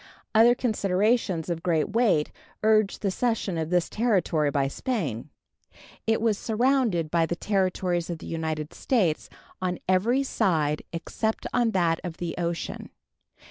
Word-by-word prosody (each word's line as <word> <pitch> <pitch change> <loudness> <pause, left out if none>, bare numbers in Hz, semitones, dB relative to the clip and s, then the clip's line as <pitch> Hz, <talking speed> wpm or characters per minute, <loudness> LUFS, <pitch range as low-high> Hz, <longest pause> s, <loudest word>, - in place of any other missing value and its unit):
Other 230 +2 +6
considerations 205 -5 +1
of 170 -2 -3
great 165 -3 +1
weight 215 -9 +2 0.3
urged 215 -2 +3
the 195 - +1
cession 225 -4 -1
of 160 0 -2
this 180 -1 +2
territory 180 -9 +1
by 140 -1 +1
Spain. 155 - -3 0.8
It 225 0 +3
was 220 -3 +1
surrounded 225 - +1
by 165 -1 +2
the 170 - -2
Territories 185 -3 0
of 170 - -3
the - - -11
United 160 -2 -3
States 190 - 0 0.3
on 180 -1 -1
every 220 +9 +2
side 160 - +1
except 220 +6 -3
on 240 -1 +3
that 170 -3 +2
of 175 -3 -6
the 170 -2 -3
ocean. 170 -1 -3
185 Hz, 140 wpm, -26 LUFS, 165-220 Hz, 0.8 s, Other